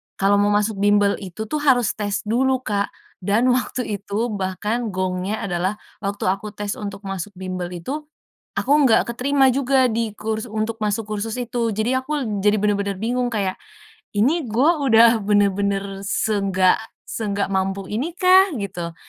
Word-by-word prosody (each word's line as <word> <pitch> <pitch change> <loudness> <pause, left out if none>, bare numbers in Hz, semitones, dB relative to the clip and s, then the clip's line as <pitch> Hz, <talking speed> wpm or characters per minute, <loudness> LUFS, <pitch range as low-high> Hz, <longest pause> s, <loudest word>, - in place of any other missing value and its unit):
kalau 200 +1 +3
mau 205 0 +3
masuk 210 -1 0
bimbel 205 0 +3
itu 195 +2 -6
tuh 305 - 0
harus 255 -6 +3
tes 205 -1 -2
dulu 255 +4 +1
Kak, 200 -3 0 0.3
dan 205 +5 +1
waktu 250 0 0 0.2
itu 215 +4 -2
bahkan 210 +4 -2
gongnya 185 +2 -2
adalah, 185 +1 -1 0.2
waktu 200 0 -4
aku 205 +2 -5
tes 205 -1 -4
untuk 200 -1 -6
masuk 195 0 -5
bimbel 185 -1 -4
itu 285 - -5 0.5
aku 280 - +2 0.2
nggak 225 - +4
keterima 265 +1 +3
juga 265 -1 +3
di 225 -2 -1
kurs 220 +2 -3
untuk 220 +1 -3
masuk 210 +1 0
kursus 215 +2 -4
itu. 240 -1 -1
Jadi 220 +4 0
aku 260 -6 -2
jadi 210 +1 +3
bener-bener 200 -1 0
bingung 245 +3 -1
kayak, 200 -5 -1 0.6
"Ini 270 +9 +2
gue 240 +7 +2 0.2
udah 230 -1 +6
bener-bener 200 -1 +1
seenggak 195 -3 +2 0.2
seenggak 205 -3 -3
mampu 195 0 -1
ini 275 +11 -2
kah, 370 +2 +6 0.2
gitu?" 175 -4 -5
210 Hz, 155 wpm, -22 LUFS, 200-240 Hz, 0.6 s, udah